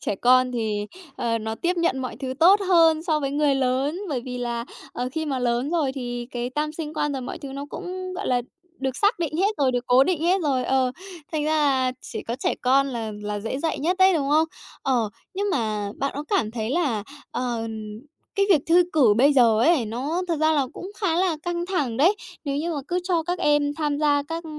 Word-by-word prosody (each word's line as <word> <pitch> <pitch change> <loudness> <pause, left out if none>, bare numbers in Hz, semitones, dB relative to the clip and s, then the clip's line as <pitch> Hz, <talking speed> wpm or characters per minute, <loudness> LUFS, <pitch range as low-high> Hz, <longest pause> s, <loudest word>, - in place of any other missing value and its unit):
Trẻ - - -2
con 255 +2 +4
thì, 215 -3 -2 0.3
ờ, 230 -1 0
nó 220 0 -4
tiếp 350 +8 -1
nhận 335 -5 +1
mọi 255 -4 -4
thứ 260 0 -4
tốt 390 +5 +7
hơn 325 -3 +5
so 315 -3 0
với 275 -1 -1
người 290 -1 +2
lớn. 270 +6 0
Bởi 265 -5 -1
vì 250 -1 -5
là, 235 -1 -3 0.3
ờ, 250 +1 -3
khi 315 -1 -2
mà 270 -3 -1
lớn 245 +3 0
rồi 305 -6 +1
thì 245 -2 -5
cái 245 0 -3
tam 300 +3 -2
sinh 315 -1 -6
quan 295 -1 0
rồi 265 -2 -3
mọi 335 +8 -6
thứ 280 -4 -8
nó 280 +1 -6
cũng, 370 +1 -5
gọi 395 - -4
là, 245 -1 +1 0.4
được 265 -1 -2
xác 410 -1 +2
định 315 -2 -2
hết 400 +4 +2
rồi, 265 -3 +2
được 245 0 -2
cố 255 +2 +6
định 355 -4 0
hết 365 +3 +3
rồi 265 -4 +1
ờ, 260 -1 +1 0.4
thành 300 -1 -1
ra 310 - 0
là 265 -4 +2
chỉ - - -6
có 235 - -4
trẻ - - 0
con 270 +2 +4
là 230 -4 -4
là 205 0 -3
dễ 225 +5 -3
dạy 325 +1 -1
nhất 350 +6 0
đấy, 375 -1 +6
đúng 280 -3 0
không? 310 +2 +4 0.4
Ờ, 240 -5 +1 0.3
nhưng 400 +2 -1
mà 215 - -1
bạn 275 0 -1
có 290 +1 -4
cảm 310 - +1
thấy 225 0 -3
là, 275 -10 0 0.3
ờ, 235 -2 -2 0.7
cái 395 -1 +2
việc 315 -7 +6
thư 345 +2 +6
cử 250 -10 +5
bây 280 +4 +5
giờ 235 -5 +5
ấy, 310 -4 +4
nó 280 +11 -2
thật 330 - +1
ra 315 0 +4
là 280 -4 +2
cũng 375 - -8
khá 340 -5 +1
là 360 -3 +1
căng 345 0 -2
thẳng 290 -12 -1
đấy. 360 +9 +4 0.3
Nếu 280 -1 -1
như 330 +3 -1
mà 295 - -2
cứ 360 +1 0
cho 345 -3 +1
các 355 +2 -2
em 295 -1 +2
tham 295 -2 -1
gia 290 -1 +3
các 330 +1 -4
280 Hz, 235 wpm, -24 LUFS, 250-330 Hz, 0.7 s, tốt